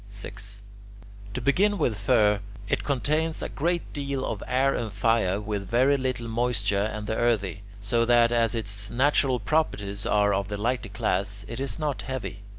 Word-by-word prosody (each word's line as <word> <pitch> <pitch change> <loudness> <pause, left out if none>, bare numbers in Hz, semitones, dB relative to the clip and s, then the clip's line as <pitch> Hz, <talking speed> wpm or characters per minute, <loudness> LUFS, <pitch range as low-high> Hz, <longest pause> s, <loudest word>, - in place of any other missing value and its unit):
6. 100 0 -9 0.7
To 130 - -2
begin 200 - +3
with 125 - +1
fir: 105 -1 +3 0.3
it - - 0
contains 155 +4 0
a - - -3
great 170 +3 -2
deal 140 -2 -2
of - - -3
air 135 +2 +2
and 110 -3 -3
fire 100 -2 +1
with 105 -2 -4
very 130 +5 +4
little 130 -3 -2
moisture 110 -3 0
and 105 -1 -5
the 110 - -2
earthy, 100 -6 0 0.2
so 110 +3 +1
that, 120 0 +5
as 115 -1 +2
its 105 -2 -2
natural 130 0 +2
properties 105 -6 -1
are 105 -1 +3
of 100 0 0
the 105 0 -4
lighter 120 +1 -1
class, 100 0 -1
it 115 - -6
is 135 0 -3
not 150 -3 -2
heavy. 100 -7 -5
115 Hz, 170 wpm, -26 LUFS, 100-130 Hz, 0.7 s, that